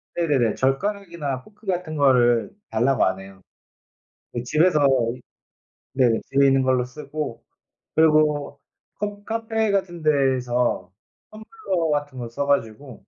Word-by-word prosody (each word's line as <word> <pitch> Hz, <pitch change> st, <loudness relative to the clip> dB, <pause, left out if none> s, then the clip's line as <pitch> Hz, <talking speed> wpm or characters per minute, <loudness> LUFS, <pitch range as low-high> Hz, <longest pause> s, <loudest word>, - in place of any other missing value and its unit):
네네네 140 Hz, -10 st, +1 dB
젓가락이나 160 Hz, -2 st, -2 dB
포크 210 Hz, 0 st, -21 dB
같은 175 Hz, -4 st, -2 dB
거를 125 Hz, -5 st, +3 dB, 0.2 s
달라고 120 Hz, +4 st, +2 dB
안 95 Hz, 0 st, -1 dB
해요. 95 Hz, -1 st, -13 dB, 0.9 s
네. 120 Hz, -, -3 dB
집에서 155 Hz, +4 st, +3 dB, 1.1 s
네 130 Hz, -3 st, +3 dB, 0.2 s
집에 140 Hz, 0 st, +3 dB
있는 135 Hz, 0 st, +4 dB
걸로 130 Hz, -1 st, +2 dB
쓰고 130 Hz, -1 st, -6 dB, 0.5 s
그리고 150 Hz, -2 st, +3 dB, 0.4 s
커 205 Hz, +1 st, -5 dB
카페 225 Hz, -1 st, -1 dB
같은 185 Hz, -4 st, -2 dB
데에서 125 Hz, -8 st, +1 dB, 0.4 s
텀블러 215 Hz, -, -3 dB
같은 145 Hz, -2 st, -2 dB
거 120 Hz, -, -5 dB
써 140 Hz, +4 st, -3 dB
가지고 130 Hz, -1 st, -1 dB
145 Hz, 250 characters per minute, -23 LUFS, 125-175 Hz, 1.1 s, 있는